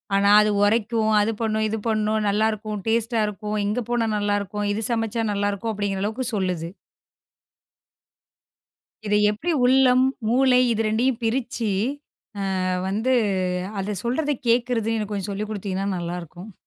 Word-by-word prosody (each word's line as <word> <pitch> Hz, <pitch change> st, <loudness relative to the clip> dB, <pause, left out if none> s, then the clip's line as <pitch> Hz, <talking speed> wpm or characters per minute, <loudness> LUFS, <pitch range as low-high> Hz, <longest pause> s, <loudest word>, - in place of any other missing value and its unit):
ஆனா 200 Hz, 0 st, +3 dB
அது 210 Hz, 0 st, +2 dB
உரைக்கும், 220 Hz, +1 st, +2 dB
அது 220 Hz, +2 st, +1 dB
பண்ணும், 220 Hz, -1 st, 0 dB
இது 220 Hz, -, -2 dB
பண்ணும், 215 Hz, 0 st, +1 dB
நல்லா 215 Hz, +2 st, +2 dB
இருக்கும், 215 Hz, -1 st, -5 dB
டேஸ்ட்டா 230 Hz, 0 st, +1 dB
இருக்கும், 210 Hz, +1 st, -4 dB
இங்க 215 Hz, +4 st, -1 dB
போனா 235 Hz, -2 st, +1 dB
நல்லா 205 Hz, 0 st, 0 dB
இருக்கும், 205 Hz, +1 st, -4 dB
இது 220 Hz, +2 st, -3 dB
சமைச்சா 225 Hz, 0 st, -1 dB
நல்லா 205 Hz, 0 st, 0 dB
இருக்கும் 220 Hz, +3 st, -3 dB
அப்படிங்கிற 200 Hz, -2 st, -2 dB
அளவுக்குச் 235 Hz, +3 st, -3 dB
சொல்லுது. 180 Hz, -3 st, -2 dB, 2.4 s
இதை 210 Hz, 0 st, +3 dB
எப்படி 310 Hz, +12 st, -2 dB
உள்ளம், 255 Hz, 0 st, +5 dB, 0.3 s
மூளை 255 Hz, 0 st, +4 dB
இது 225 Hz, 0 st, 0 dB
2யும் 235 Hz, +3 st, +1 dB
பிரிச்சு 235 Hz, -1 st, -1 dB, 1.0 s
அ -, -, -1 dB, 0.2 s
வந்து 220 Hz, +6 st, 0 dB, 0.7 s
அதைச் 195 Hz, -1 st, -3 dB
சொல்றதை 285 Hz, +5 st, 0 dB
கேக்குறதுன்னு 230 Hz, -3 st, +1 dB
கொஞ்சம் 200 Hz, -1 st, -3 dB
சொல்லிக் 210 Hz, +2 st, -4 dB
குடுத்தீங்கன்னா 195 Hz, -2 st, -3 dB
நல்லா 175 Hz, 0 st, -4 dB
இருக்கும். 175 Hz, +5 st, -11 dB
215 Hz, 140 wpm, -23 LUFS, 205-235 Hz, 2.4 s, உள்ளம்